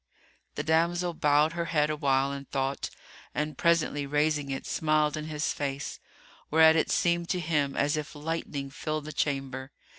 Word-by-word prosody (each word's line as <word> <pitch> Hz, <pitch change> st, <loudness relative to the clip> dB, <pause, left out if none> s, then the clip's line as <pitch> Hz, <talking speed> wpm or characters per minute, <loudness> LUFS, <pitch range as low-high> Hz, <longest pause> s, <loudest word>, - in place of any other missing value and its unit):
The 145 Hz, -, -2 dB
damsel 170 Hz, +3 st, +1 dB
bowed 150 Hz, +1 st, +3 dB
her 170 Hz, 0 st, -2 dB
head 155 Hz, -2 st, +1 dB
awhile 140 Hz, -2 st, +1 dB
in 140 Hz, 0 st, -6 dB
thought, 135 Hz, 0 st, -2 dB, 0.5 s
and 150 Hz, -1 st, -1 dB
presently 155 Hz, -3 st, +1 dB
raising 150 Hz, 0 st, +1 dB
it, 135 Hz, 0 st, -4 dB
smiled 155 Hz, -1 st, +1 dB
in 155 Hz, 0 st, -4 dB
his 155 Hz, -1 st, -1 dB
face, 140 Hz, -1 st, -4 dB, 0.5 s
whereat 160 Hz, +1 st, +6 dB
it 160 Hz, -, +2 dB
seemed 170 Hz, 0 st, +1 dB
to 180 Hz, -, 0 dB
him 150 Hz, -4 st, 0 dB
as 145 Hz, +1 st, +2 dB
if 150 Hz, 0 st, -5 dB
lightning 145 Hz, -2 st, -4 dB
filled 155 Hz, +1 st, -3 dB
the 155 Hz, -, -6 dB
chamber. 135 Hz, -2 st, -2 dB
150 Hz, 160 wpm, -28 LUFS, 140-160 Hz, 0.5 s, whereat